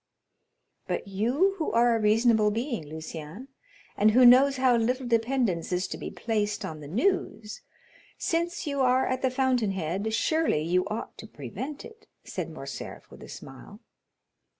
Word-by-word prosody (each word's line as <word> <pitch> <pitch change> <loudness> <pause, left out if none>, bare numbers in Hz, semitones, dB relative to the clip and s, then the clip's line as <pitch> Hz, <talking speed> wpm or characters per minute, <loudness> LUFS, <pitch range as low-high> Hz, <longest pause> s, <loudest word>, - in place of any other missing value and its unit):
"But - - -3
you 245 - +1
who 315 - -1
are 235 0 +4
a - - 0
reasonable 220 0 +4
being, 230 - -3
Lucien, 160 - -8 0.5
and 210 +2 +4
who 250 +4 +6
knows 265 +3 +7
how 255 -1 +4
little 250 +3 0
dependence 230 -7 0
is 180 +1 0
to - - -5
be - - -5
placed 210 -2 -2
on 155 -1 -6
the 145 - -9
news, 220 - -1 0.6
since 340 +1 -1
you 280 -2 -2
are 255 0 +3
at 255 0 -2
the 260 - +2
fountain 250 -5 +1
head, 190 +5 -2
surely 315 - +1
you 180 +3 +1
ought 215 +2 -6
to 220 - -9
prevent 220 - -7
it," 450 -1 -15 0.2
said - - -5
Morcerf, - - -8
with - - -13
a - - -11
smile. - - -11
230 Hz, 160 wpm, -27 LUFS, 200-260 Hz, 0.6 s, knows